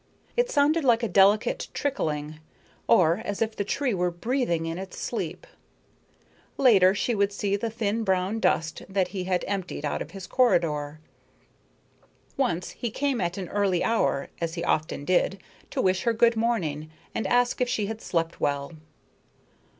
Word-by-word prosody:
It 485 +1 +2
sounded 305 -2 +3
like 240 -3 +3
a - - +2
delicate 210 - +3
trickling, 155 - -2 0.5
or 170 +3 +4
as 205 - -4
if 225 -1 -1
the 200 - -1
tree 255 +4 -1
were 180 -1 +1
breathing 175 -2 -1
in 165 +2 -4
its 190 0 -8
sleep. - - -4 1.1
Later 200 -8 +5
she 240 - 0
would 200 -1 +1
see 200 0 -1
the 225 +3 -2
thin 225 0 -1
brown 190 +2 0
dust 160 -6 0
that 190 -2 0
he 185 -3 -4
had 180 -1 0
emptied 185 -6 -3
out 145 - -2
of - - -5
his 190 +1 -8
corridor. 155 - +1 1.4
Once 180 -10 -1
he 240 - -4
came 265 0 -1
at 175 +1 -2
an 190 -2 -4
early 195 -4 +1
hour, 225 -11 +1
as 165 0 -2
he 170 - -3
often 155 -2 -1
did, 185 +3 +1 0.3
to - - -1
wish 185 -1 +2
her 235 - +1
good 230 +1 +4
morning 175 -10 -1 0.2
and - - -2
ask 245 +1 +2
if 250 - +2
she 215 -4 0
had 220 +2 -5
slept 165 -1 -2
well. 140 +1 -1
195 Hz, 165 wpm, -26 LUFS, 170-230 Hz, 1.4 s, Later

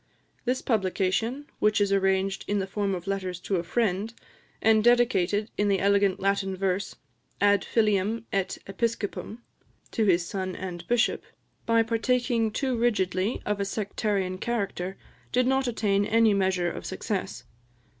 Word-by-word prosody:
This 255 +1 0
publication, 220 +5 0
which 210 0 +3
is 200 -1 +2
arranged 195 0 +1
in 205 - 0
the 195 - 0
form 195 0 -1
of 175 -1 -7
letters 190 -2 -3
to 190 0 -1
a 170 - -2
friend, 205 +2 0 0.5
and 220 -1 +4
dedicated, 225 -4 +3
in 205 -1 +3
elegant 200 0 +2
Latin 195 -1 0
verse, 195 0 -1 0.4
"Ad 205 -1 +4
Filium 215 0 +1
et 195 -2 -1
Episcopum," 220 +2 -3 0.5
(to 220 - +1
his 175 -3 +3
son, 185 +1 -4
and 175 -2 -6
bishop), 240 -1 +2 0.5
by 230 0 +4
partaking 230 0 +1
too 260 +4 -1
rigidly 205 -3 0
of 210 -1 -1
a - - +1
sectarian 200 -2 -2
character, 195 -5 -3 0.3
did 250 0 +2
not 265 0 +2
attain 205 -4 +1
any 225 0 +4
measure 190 -3 +1
of - - -7
success. - - -4
200 Hz, 145 wpm, -27 LUFS, 190-225 Hz, 0.5 s, and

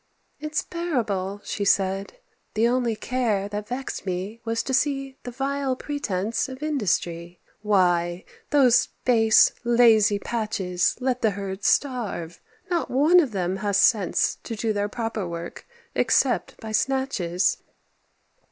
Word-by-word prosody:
"It's 305 0 -2
bearable," 215 - -2
she 205 - -3
said; 195 0 +1 0.4
"the 225 +2 +3
only 240 -2 +1
care 215 -4 -1
That 210 0 -5
vexed 255 +3 -5
me 195 +5 -4
was 225 0 -1
to 265 - -3
see 275 0 0
the 245 - -7
vile 270 +1 -2
pretence 230 -7 -2
Of 260 +2 -8
industry. 175 - -2 0.2
Why, 180 -4 +1 0.2
those 265 -5 +4 0.2
base, 225 -3 +5
lazy 230 -3 +5
patches 200 -5 -1
Let 255 -1 -1
the 220 - +3
herds 195 0 -3
starve; 215 - -1 0.3
not 350 -3 -1
one 300 +8 +5
of 290 -8 +1
them 185 -2 -2
has 200 0 0
sense 200 -2 +3
To 225 - -6
do 220 +1 -1
their 205 0 -1
proper 225 -4 -3
work, 170 0 -7 0.3
except - - +1
by 220 -2 -7
snatches." 215 -8 0
220 Hz, 135 wpm, -24 LUFS, 195-260 Hz, 0.4 s, base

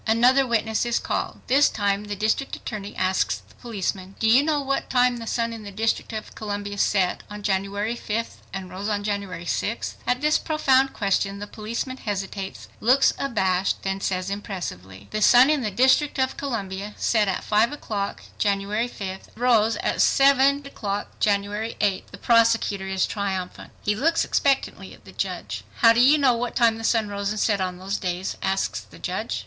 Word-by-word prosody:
Another 250 +4 +4
witness 220 -2 +1
is 240 0 0
called. - - -3
This 280 +3 +4
time 200 0 -1
the 205 0 -4
district 220 +7 0
attorney 205 -3 -7
asks 185 0 +1
the - - -20
policeman,—"Do 195 -2 -3
you 240 +5 +6
know 300 0 +1
what 275 -1 -2
time 250 -1 +3
the 230 -1 -7
sun 230 0 -1
in 225 - -8
the 205 - -8
District 220 +4 -1
of 215 -1 -6
Columbia 205 -1 -5
set 190 -3 +1
on 210 0 -8
January 200 +3 -1
5th 230 0 -3
and 190 -2 -6
rose 195 +3 -4
on 205 -1 -1
January 200 -4 -3
6th?" 215 +6 -2
At 250 0 +1
this 300 +1 +3
profound 270 -4 +2
question, 195 0 0
the 205 - -6
policeman 230 +5 -5
hesitates, 195 -3 -5
looks 255 +5 +4
abashed, 190 -8 0
then 195 0 -2
says 185 0 -2
impressively, 100 - -6
"The 215 - -2
sun 250 +6 +7
in 300 -3 +1
the 215 - -1
District 260 +8 +3
of 260 0 0
Columbia 205 -6 -4
set 215 -3 +2
at 190 - -1
5 215 +4 +2
o'clock 210 -9 -4 0.2
January 205 +3 0
5th, 190 -4 -7
and - - -24
rose 225 -2 +3
at - - 0
7:28 275 +1 +4
o'clock 205 -7 -5
January 205 +2 0
6th." 200 -3 0
The 200 - -11
prosecutor 225 -3 +2
is 190 0 +1
triumphant. 190 -3 -4
He 210 - +2
looks 330 +9 +2
expectantly 275 -1 0
at - - -24
the - - -12
judge. - - -4 0.2
"How 230 -1 +8
do 230 - +1
you 280 +5 +6
know 270 -4 +4
what 240 0 -3
time 230 -3 +3
the - - -7
sun 225 -1 +2
rose 200 0 -3
and 215 0 -3
set 205 -3 +1
on 180 -1 -2
those 195 +2 -3
days?" 180 0 -3
asks 190 0 -1
the - - -15
judge. - - -3
210 Hz, 185 wpm, -24 LUFS, 195-240 Hz, 0.2 s, How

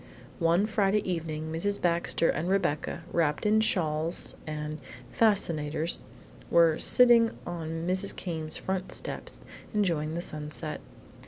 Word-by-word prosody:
One 170 +4 +3
Friday 210 -1 +1
evening 160 -3 -3
Mrs. 200 +5 -1
Baxter 170 -1 +1
and 170 +3 -2
Rebecca, 170 -3 0
wrapped 160 +1 +1
in 215 +1 +4
shawls 165 -5 0
and 150 0 -4 0.3
"fascinators," 165 -7 +1 0.5
were 165 -2 +5
sitting 240 -2 +5
on 165 -1 -4
Mrs. 185 +2 +1
Came's 160 -3 -3
front 190 -1 -3
steps - - -5 0.3
enjoying 165 -6 0
the 170 - -2
sunset. 150 -1 -4
170 Hz, 115 wpm, -29 LUFS, 155-195 Hz, 0.5 s, were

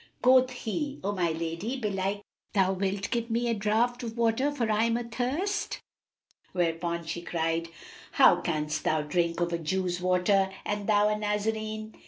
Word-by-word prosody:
Quoth 255 0 +6
he, 265 +4 -4
"O 200 - 0
my 180 -4 0
lady, 165 +10 -3
belike 200 -2 -2 0.3
thou 190 -2 +3
wilt 195 +1 -2
give 235 -1 -1
me 235 +1 0
a 235 - +2
draught 225 +4 +1
of 230 -1 -6
water, 235 +4 +2
for 240 -6 -1
I 215 +1 +3
am 230 0 +1
athirst." 250 - -2 0.7
Whereupon 170 -1 -1
she 170 +1 -4
cried, 165 -1 -1 0.5
"How - - +6
canst 150 -2 -2
thou 155 -1 +1
drink 170 +2 0
of 170 0 0
a 170 - 0
Jew's 180 +2 -1
water, 185 +2 +3 0.2
and 205 -1 -2
thou 210 -1 +4
a 210 - +1
Nazarene?" 215 +1 -2
205 Hz, 165 wpm, -28 LUFS, 175-230 Hz, 0.7 s, Quoth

